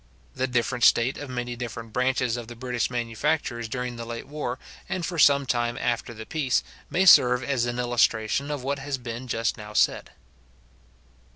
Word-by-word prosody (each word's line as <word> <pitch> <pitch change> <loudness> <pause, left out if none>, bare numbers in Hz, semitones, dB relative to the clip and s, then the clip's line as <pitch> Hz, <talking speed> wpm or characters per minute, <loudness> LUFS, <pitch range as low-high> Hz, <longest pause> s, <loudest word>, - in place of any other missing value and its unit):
The 130 - -1
different 125 0 -1
state 120 +4 +4
of 145 - -7
many 120 -1 -4
different 115 -2 -7
branches 125 -1 +1
of 120 -2 -6
the 120 - -9
British 125 -1 -2
manufactures 120 0 -2
during 125 +1 -4
the 115 - -5
late 115 0 -6
war, 140 -4 -4 0.3
and 185 -3 -2
for 170 -1 -4
some 140 -1 +5
time 120 -1 0
after 120 -2 -1
the 110 -1 -9
peace, 140 -3 0 0.3
may 190 +2 +2
serve 125 -7 +7
as 125 -2 0
an 120 0 -3
illustration 120 +2 +1
of 145 -3 -3
what 140 +1 -2
has 135 0 -3
been 120 0 -7
just 115 -1 -1
now 105 -1 -9
said. - - +2
125 Hz, 180 wpm, -26 LUFS, 120-135 Hz, 0.3 s, serve